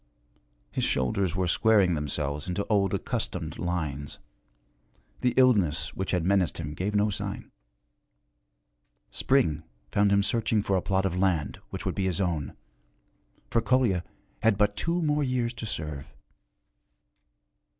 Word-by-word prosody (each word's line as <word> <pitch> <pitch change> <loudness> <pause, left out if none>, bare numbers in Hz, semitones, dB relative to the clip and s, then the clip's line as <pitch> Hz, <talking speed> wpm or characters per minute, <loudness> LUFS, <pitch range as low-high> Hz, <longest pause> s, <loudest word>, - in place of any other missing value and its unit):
His - - -2
shoulders 85 +8 0
were 90 -1 0
squaring 100 -1 +4
themselves 75 0 -2
into 95 +3 -2
old 100 -2 +3
accustomed - - -3
lines, 75 -5 -3 1.0
the 125 - +1
illness 90 - +3
which 95 - -4
had 90 -3 0
menaced 95 -4 +2
gave 100 +6 -2
no 105 +1 +3
sign. - - -5 1.6
Spring 100 - +2 0.3
found 100 0 +3
him 100 0 +4
searching 110 -1 +1
for 100 - +1
a 95 - +2
plot 95 0 0
of 90 -1 -1
land 90 -7 +1
which - - -6
would - - 0
be 95 - -1
his 90 -2 0
own, 85 -7 -1 1.0
for 115 - +3
Kolya 115 -9 +2 0.4
had 110 -3 +3
but 105 0 +2
two 170 +6 0
more 150 -1 +2
years 125 -2 0
to 115 -1 -6
serve. 75 -8 -5
95 Hz, 135 wpm, -27 LUFS, 85-110 Hz, 1.6 s, squaring